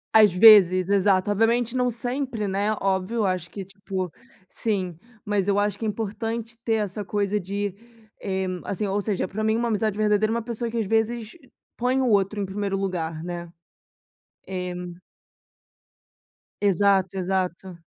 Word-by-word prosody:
Às 210 -3 +8
vezes, 185 -2 +7
exato. 200 0 +3
Obviamente 230 +3 +1
não 250 -1 +2
sempre, 245 -2 -3
né, 200 +2 0
óbvio, 190 +3 -1
eu 215 - +2
acho 180 -2 -1
que, 195 +1 -7
tipo 195 -3 -5 0.4
sim. 190 -6 -2 0.3
Mas 205 -2 0
eu 200 0 +2
acho 205 0 +1
que 225 - -3
é - - 0
importante 225 +2 -4
ter 225 - +1
essa 210 -1 -2
coisa 205 +1 -1
de, 200 +1 -3 0.5
eh, 190 -1 -2 0.2
assim, 200 +2 -3
ou 200 +1 0
seja, 195 -3 -1
pra 215 +4 -4
mim 220 +1 +2
uma 235 0 0
amizade 215 -1 0
verdadeira 215 0 +2
é - - 0
uma 235 - -2
pessoa 235 0 -3
que 235 - -4
às 220 - 0
vezes 225 +1 0 0.4
põe 250 +2 +1
o 260 - +1
outro 205 -1 +2
em 200 - -1
1º 195 0 -2
lugar, 165 -4 -3
né. 175 -1 -6 1.0
É. 180 -1 -4 1.9
Exato, 195 -1 +2
exato. 185 -2 -3
205 Hz, 160 wpm, -24 LUFS, 190-220 Hz, 1.9 s, Às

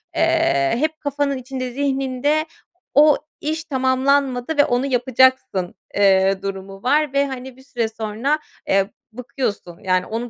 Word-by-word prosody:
Eee, 325 - +2
hep 310 +4 -1
kafanın 285 -1 -1
içinde, 255 0 -5
zihninde 275 +2 0 0.5
o 295 +1 +6 0.2
iş 315 +2 -2
tamamlanmadı 265 0 +1
ve 290 - +6
onu 245 +2 0
yapacaksın, 260 -6 +2 0.2
eee, 195 -1 +3
durumu 195 0 -6
var 295 +2 +2
ve, 280 0 +2
hani, 260 -1 -8
bir 265 - -17
süre 240 -4 -2
sonra, 225 +7 -2 0.3
eee, 195 0 +2 0.2
bıkıyorsun. 235 -7 -4
Yani, 185 -1 +1
onu 230 +2 -4
260 Hz, 135 wpm, -21 LUFS, 220-280 Hz, 0.5 s, o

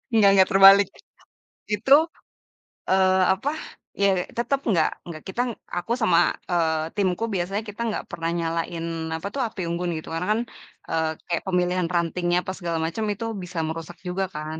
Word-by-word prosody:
Nggak 210 -3 +6
nggak, 190 -1 +6
terbalik. 195 +1 +8 0.9
Itu, 230 +7 +3 1.0
eee, 190 0 +4
apa, 195 +9 -2 0.5
ya 200 - +5 0.3
tetep 270 +3 0
nggak 170 -7 +3 0.2
nggak 160 -2 -7
kita 190 +6 -2
ng - - -4 0.2
aku 175 +6 -3
sama, 180 -6 +4 0.3
eee, 160 -2 +1
timku 195 +1 0
biasanya 195 +4 -2
kita 210 +3 -7
nggak 215 - -3
pernah 165 0 -2
nyalain 165 0 -2 0.3
apa 160 +4 -5
tuh, 275 - -1
api 210 -3 -7
unggun 175 +1 -2
gitu. 155 - -8
Karena 165 +2 -2
kan, 225 - 0 0.5
eee, 160 -1 +1 0.2
kayak 170 -2 -1
pemilihan 180 -1 +1
rantingnya 175 +1 +1
apa - - -4
segala 170 -3 -2
macem 170 +7 -3
itu 210 +3 -6 0.2
bisa 175 -1 -5
merusak 165 +2 -6
juga 190 +2 -1
kan. 155 +1 -5
180 Hz, 165 wpm, -24 LUFS, 165-200 Hz, 1.0 s, terbalik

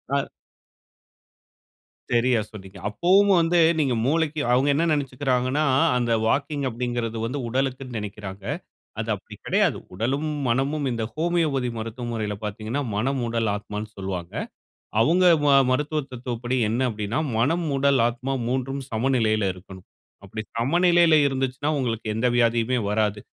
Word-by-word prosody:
ஆ. 140 - 0 1.8
செரியா 120 0 +3
சொன்னீங்க. 95 -2 -11
அப்போவும் 190 - +4
வந்து 170 +1 +3 0.2
நீங்க 135 -5 +2
மூளைக்கு 155 0 +1
அவுங்க 130 +3 +3
என்ன 165 +4 +1
நெனச்சிக்குறாங்கன்னா, 135 0 0 0.3
அந்த 120 -1 0 0.2
வாக்கிங் 140 +2 0
அப்படிங்கிறது 120 -1 -3
வந்து 130 +5 -3
உடலுக்குனு 130 0 -2
நெனைக்குறாங்க. 100 -2 -7 0.6
அது - - -4
அப்படி - - -11
கிடையாது. - - +2 0.2
உடலும், 135 +9 -1 0.2
மனமும் 140 +4 0
இந்த 115 -1 -2
ஹோமியோபதி 155 -6 0
மருத்துவ 115 +2 -5
முறையில 105 -2 -3
பாத்தீங்கனா, 110 +7 -3
மனம், 130 +4 0
உடல், 115 -1 0
ஆத்மானு 105 +1 -6
சொல்வாங்க. 90 -3 -5 0.7
அவுங்க 175 +10 +4 0.2
ம - - +2 0.2
மருத்துவ 150 +4 0
தத்துவப்படி 125 0 -3
என்ன 120 +4 0
அப்படினா 105 +1 -3 0.2
மனம், 165 +8 +1
உடல், 140 -1 +3
ஆத்மா 125 +3 -3
3உம் 130 +2 -2
சமநிலையில 110 -3 +1
இருக்கனும். 95 0 -13 0.4
அப்படி 105 +3 -6 0.2
சமநிலையில 170 +5 +4
இருந்துச்சுனா 135 +2 -1
உங்களுக்கு 115 -4 -2
எந்த 120 +3 +1
வியாதியுமே 120 +1 +2
வராது. 105 0 0
125 Hz, 125 wpm, -24 LUFS, 110-140 Hz, 1.8 s, அப்போவும்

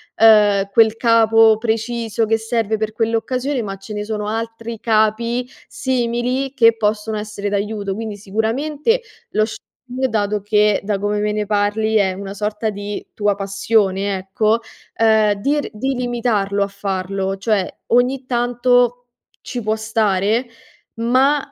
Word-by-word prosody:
ehm, 210 -3 +5
quel 220 0 +4
capo 225 -1 +5
preciso 225 0 -1
che 225 +1 +2
serve 225 -1 -1
per 215 0 -2
quell'occasione 245 +4 -1
ma 195 -3 -5
ce 195 +2 -9
ne 210 0 -3
sono 210 -1 -4
altri 225 +1 -4
capi 230 +3 +1 0.2
simili 255 +1 -1
che 230 -3 +5
possono 215 0 -1
essere 210 -1 -5
d'aiuto. 205 0 -2
Quindi 215 0 -5
sicuramente 275 - -1 0.3
lo 215 0 +2
shopping 255 +3 -5
dato 210 -1 -1
che, 210 0 +2
da 200 -1 -1
come 205 +1 -1
me 210 0 0
ne 210 0 -2
parli, 210 +1 0
è 200 -3 +3
una 195 +1 -7
sorta 210 +2 -2
di 205 0 -5
tua 205 -1 +1
passione, 195 0 0
ecco, 215 +4 0 0.4
ehm, 220 -2 +3
di 275 +9 0
r - - -4
di 265 +6 -2
limitarlo 230 -5 0
a - - -2
farlo; 195 -1 -3
cioè 200 -1 +1 0.2
ogni 250 +2 +2
tanto 245 0 +1 0.4
ci 245 - -5
può 215 0 0
stare 220 +1 +1 0.5
ma 260 +5 +3
220 Hz, 140 wpm, -19 LUFS, 205-235 Hz, 0.5 s, ehm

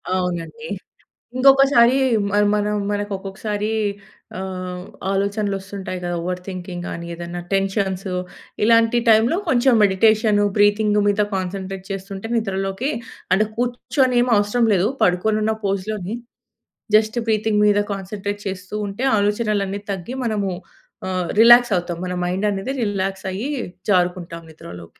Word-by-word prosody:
అవునండి. 180 +4 -3 0.7
ఇంకొకసారీ 270 -2 +6 0.3
మ - - -6 0.2
మనం 210 0 0 0.2
మనక్కొక్కసారి 205 +1 -3 0.7
ఆహ్, 185 -1 -5 0.3
ఆలోచనలొస్తుంటాయి 195 -2 -2
కదా! 175 0 -2
ఓవర్ 180 +1 -3
థింకింగ్ 180 -1 -6
కానీ, 170 - -6
ఏదన్నా 175 +1 -6
టెన్షన్సు. 195 -1 -1 0.5
ఇలాంటి 230 +1 +4
టైమ్‌లో 225 +9 +4
కొంచం 255 -1 +4
మెడిటేషను, 210 +1 +3
బ్రీతింగు 205 0 +3
మీద 205 +1 +2
కాన్సంట్రేట్ 190 0 -4
చేస్తుంటే, 195 +2 -6
నిద్రలోకి 195 +3 -1 0.4
అంటే, 215 +3 +3
కూర్చొనేమి 245 +1 +1
అవసరం 205 +4 +2
లేదు, 190 +2 +2 0.2
పడుకొనున్న 215 +4 +2
పోజ్‌లోనే 200 +1 -2 0.8
జస్ట్ 215 +2 +3
బ్రీతింగ్ 215 -1 +1
మీద 205 0 +4
కాన్సంట్రేట్ 200 +1 -5
చేస్తూ 185 +1 -6
ఉంటే. 200 +6 -5
ఆలోచనలన్ని 205 -1 0
తగ్గి 195 +6 -5
మనము 210 -4 -1 0.6
ఆహ్, 185 -2 -2
రిలాక్సవుతాం. 225 -8 +5
మన 180 - -3
మైండనేది 195 +5 -1
రిలాక్సయ్యీ 195 +3 -2 0.4
జారుకుంటాం 175 -2 0
నిద్రలోకి. 90 - -12
200 Hz, 105 wpm, -21 LUFS, 185-220 Hz, 0.8 s, ఇంకొకసారీ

